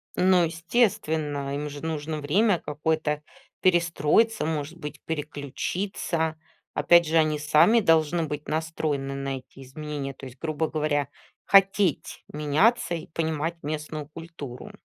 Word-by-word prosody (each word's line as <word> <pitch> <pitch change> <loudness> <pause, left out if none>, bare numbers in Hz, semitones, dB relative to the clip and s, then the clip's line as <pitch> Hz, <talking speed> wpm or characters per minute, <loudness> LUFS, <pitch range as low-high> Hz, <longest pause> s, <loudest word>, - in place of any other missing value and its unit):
Ну, 180 -1 +4
естественно, 160 - 0
им 150 +1 -3
же 145 +2 -8
нужно 155 -1 -3
время 185 +6 +3
какое-то, 150 0 -1 0.4
перестроиться, 175 +5 +3
может 155 +1 -3
быть, 150 -3 -8
переключиться. 160 +2 -3 0.4
Опять 170 0 +5
же, 160 +1 +2
они 155 -1 +2
сами 155 +9 +5
должны 165 -3 +3
быть 150 -1 -5
настроены 155 -3 -2
на 135 0 -3
эти 130 +1 -13
изменения, 140 +1 -5
то 135 - -11
есть, 125 +1 -13
грубо 160 0 -1
говоря, 150 -2 0 0.4
хотеть 195 -4 +3
меняться 150 +9 +2
и 165 - -7
понимать 160 0 -2
местную 150 0 -4
культуру. 150 -6 -9
155 Hz, 125 wpm, -26 LUFS, 145-170 Hz, 0.4 s, Опять